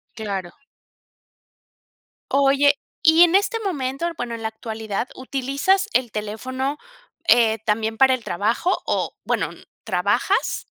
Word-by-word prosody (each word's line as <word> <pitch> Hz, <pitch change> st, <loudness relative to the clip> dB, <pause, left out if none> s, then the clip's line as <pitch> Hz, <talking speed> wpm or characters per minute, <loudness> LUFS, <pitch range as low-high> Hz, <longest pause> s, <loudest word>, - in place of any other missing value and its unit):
Claro. 195 Hz, -5 st, -4 dB, 1.8 s
Oye, 280 Hz, +1 st, +4 dB, 0.2 s
y 320 Hz, +1 st, +7 dB
en 350 Hz, +1 st, +4 dB
este 430 Hz, +3 st, +2 dB
momento, 290 Hz, -6 st, -2 dB
bueno, 240 Hz, -1 st, -4 dB
en 230 Hz, -, -8 dB
la -, -, 0 dB
actualidad, 220 Hz, +1 st, -5 dB
¿utilizas 275 Hz, +10 st, 0 dB
el 245 Hz, -3 st, +1 dB
teléfono, 260 Hz, +7 st, -3 dB, 0.5 s
eh, 225 Hz, -2 st, +5 dB
también 220 Hz, +1 st, 0 dB
para 265 Hz, +1 st, +5 dB
el 255 Hz, -3 st, -3 dB
trabajo? 225 Hz, -, 0 dB
O -, -, -1 dB
bueno, -, -, 0 dB, 0.3 s
¿trabajas? -, -, 0 dB
255 Hz, 115 wpm, -22 LUFS, 220-285 Hz, 1.8 s, y